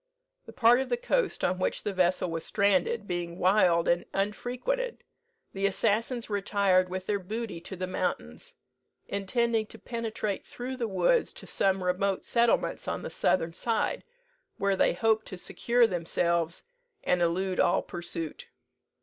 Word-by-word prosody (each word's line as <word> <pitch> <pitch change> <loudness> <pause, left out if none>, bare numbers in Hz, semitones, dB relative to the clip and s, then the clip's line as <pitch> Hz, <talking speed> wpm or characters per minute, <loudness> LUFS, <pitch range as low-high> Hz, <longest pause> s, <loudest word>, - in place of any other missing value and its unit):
The - - -8
part 240 0 +5
of 265 - -2
the 485 - +1
coast - - 0
on 185 +1 +1
which 185 - -1
the 205 - -2
vessel 180 -1 +1
was 165 -1 -3
stranded 200 +1 +1
being 175 -1 -3
wild 180 -3 +4
and 175 0 +2
unfrequented, 250 - -2 0.5
the 195 0 +1
assassins 225 +4 0
retired 200 -3 +2
with 185 0 -4
their 205 0 0
booty 210 -1 -5
to 190 - -7
the 185 0 -3
mountains, 80 - -4 0.5
intending 220 +3 0
to 225 - -11
penetrate 225 -4 -3
through 255 +2 -6
the 235 -2 -1
woods 220 - +2
to - - -9
some 190 -1 +1
remote 185 +2 0
settlements 235 -1 +1
on - - -3
the - - -5
southern 165 -2 +1
side, 225 +5 -1 0.5
where 200 0 +1
they - - +3
hoped 220 +3 +1
to 185 - -7
secure 235 +6 +2
themselves, 170 -3 0 0.4
and 180 -1 +1
elude 180 +2 0
all - - +3
pursuit. 170 -2 -6
195 Hz, 150 wpm, -28 LUFS, 180-230 Hz, 0.5 s, part